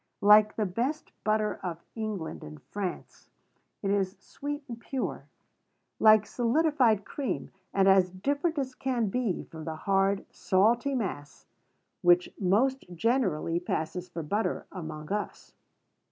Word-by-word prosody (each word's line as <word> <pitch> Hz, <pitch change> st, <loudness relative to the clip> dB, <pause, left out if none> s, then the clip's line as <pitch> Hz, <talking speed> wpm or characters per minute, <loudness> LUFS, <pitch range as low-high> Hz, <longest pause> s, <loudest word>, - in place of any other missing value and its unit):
Like 210 Hz, +1 st, +7 dB
the 215 Hz, -, 0 dB
best 245 Hz, -, -2 dB
butter 215 Hz, 0 st, +1 dB
of 175 Hz, -3 st, -4 dB
France -, -, -35 dB
and 225 Hz, -, -4 dB
England, 160 Hz, -, -5 dB, 1.2 s
it 195 Hz, -, +1 dB
is 195 Hz, -1 st, 0 dB
sweet 290 Hz, +1 st, -6 dB
and 235 Hz, -1 st, -7 dB
pure, 260 Hz, +2 st, -4 dB, 0.7 s
like 215 Hz, -1 st, +7 dB
solidified 245 Hz, -4 st, +2 dB
cream, 275 Hz, -3 st, -3 dB, 0.2 s
and 195 Hz, -1 st, +3 dB
as 190 Hz, -1 st, +6 dB
different 285 Hz, -, -1 dB
as 265 Hz, -2 st, -2 dB
can 250 Hz, -5 st, -1 dB
be 230 Hz, -4 st, -1 dB
from 160 Hz, -1 st, -10 dB
the 160 Hz, -, -4 dB
hard, 195 Hz, +3 st, +1 dB
salty 235 Hz, +8 st, +2 dB
mass 160 Hz, -, -4 dB, 0.6 s
which 175 Hz, 0 st, +4 dB
most 235 Hz, +8 st, +2 dB
generally 180 Hz, -, +1 dB
passes 175 Hz, +1 st, -3 dB
for 165 Hz, -, -5 dB
butter 205 Hz, +9 st, -1 dB
among 155 Hz, -4 st, -7 dB
us. 210 Hz, 0 st, -4 dB
205 Hz, 130 wpm, -29 LUFS, 180-245 Hz, 1.2 s, Like